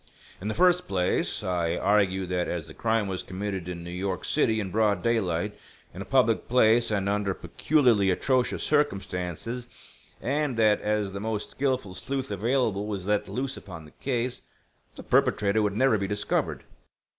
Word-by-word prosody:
"In 100 Hz, -, -4 dB
the 110 Hz, -, -2 dB
first 180 Hz, 0 st, +4 dB
place, 90 Hz, -2 st, 0 dB
I 85 Hz, -2 st, 0 dB
argued 95 Hz, -2 st, +2 dB
that 90 Hz, -1 st, 0 dB
as 85 Hz, -2 st, -3 dB
the -, -, -10 dB
crime 110 Hz, -2 st, 0 dB
was 95 Hz, -1 st, -3 dB
committed 95 Hz, -2 st, -4 dB
in 85 Hz, -1 st, -6 dB
New 85 Hz, -, -7 dB
York 90 Hz, 0 st, -3 dB
City 110 Hz, -1 st, +2 dB
in 95 Hz, -3 st, -3 dB
broad 105 Hz, -3 st, +2 dB
daylight, 105 Hz, -4 st, 0 dB, 0.4 s
in 95 Hz, -, -7 dB
a -, -, -5 dB
public 125 Hz, -4 st, +2 dB
place 115 Hz, -1 st, +4 dB
and 100 Hz, -2 st, 0 dB
under 100 Hz, -1 st, 0 dB
peculiarly 120 Hz, -10 st, +2 dB
atrocious 125 Hz, +7 st, +1 dB
circumstances, 115 Hz, -, -1 dB, 0.5 s
and 140 Hz, -1 st, -1 dB
that 110 Hz, -2 st, +4 dB
as 105 Hz, -2 st, -1 dB
the 100 Hz, -, -4 dB
most 110 Hz, 0 st, -3 dB
skilful 130 Hz, -8 st, -1 dB
sleuth 135 Hz, +6 st, -4 dB
available 105 Hz, -1 st, 0 dB
was 100 Hz, -3 st, -4 dB
let 105 Hz, 0 st, 0 dB
loose 130 Hz, +1 st, -3 dB
upon 80 Hz, -5 st, -10 dB
the 75 Hz, -, -15 dB
case, 125 Hz, -2 st, -2 dB, 0.5 s
the -, -, -9 dB
perpetrator 105 Hz, +1 st, +2 dB
would 105 Hz, -1 st, 0 dB
never 130 Hz, -4 st, +3 dB
be 100 Hz, -, -1 dB
discovered. 105 Hz, +1 st, -1 dB
105 Hz, 170 wpm, -27 LUFS, 95-120 Hz, 0.5 s, first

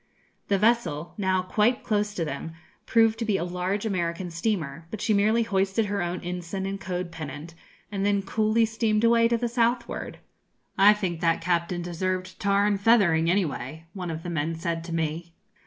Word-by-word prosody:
The 200 Hz, -, +2 dB
vessel, 210 Hz, -8 st, +1 dB
now 190 Hz, -3 st, +1 dB
quite 215 Hz, +6 st, +1 dB
close 210 Hz, -1 st, 0 dB
to 170 Hz, -, -1 dB
them, 150 Hz, +2 st, -5 dB, 0.3 s
proved 225 Hz, -1 st, +4 dB
to 230 Hz, -, -1 dB
be 210 Hz, -3 st, +1 dB
a 170 Hz, -, -2 dB
large 180 Hz, +4 st, -2 dB
American 175 Hz, -3 st, -2 dB
steamer, 165 Hz, -4 st, -2 dB
but 220 Hz, -, -6 dB
she 215 Hz, +1 st, +1 dB
merely 215 Hz, +3 st, +3 dB
hoisted 195 Hz, +1 st, +1 dB
her 205 Hz, -1 st, -2 dB
own 175 Hz, +1 st, -3 dB
ensign 180 Hz, +2 st, -4 dB
and 195 Hz, 0 st, -4 dB
code 180 Hz, -1 st, -4 dB
pennant, 155 Hz, 0 st, -7 dB, 0.4 s
and 195 Hz, -1 st, -2 dB
then 200 Hz, -1 st, +2 dB
coolly 220 Hz, +2 st, +2 dB
steamed 220 Hz, -1 st, 0 dB
away 230 Hz, 0 st, +5 dB
to 235 Hz, 0 st, +1 dB
the 240 Hz, +1 st, -1 dB
southward. 235 Hz, 0 st, -1 dB, 0.6 s
'I 200 Hz, +2 st, +7 dB
think 180 Hz, -5 st, -3 dB
that 165 Hz, -1 st, +2 dB
captain 175 Hz, 0 st, -1 dB
deserved 185 Hz, +2 st, -3 dB
tarring 200 Hz, +1 st, +2 dB
and 200 Hz, -, -3 dB
feathering, 190 Hz, -8 st, +4 dB
anyway,' 165 Hz, -3 st, -1 dB
one 180 Hz, -3 st, -5 dB
of 160 Hz, 0 st, -5 dB
the 175 Hz, -, -4 dB
men 160 Hz, 0 st, -1 dB
said 165 Hz, 0 st, -3 dB
to 170 Hz, -1 st, -4 dB
me. 165 Hz, +1 st, -3 dB
190 Hz, 185 wpm, -26 LUFS, 170-215 Hz, 0.6 s, I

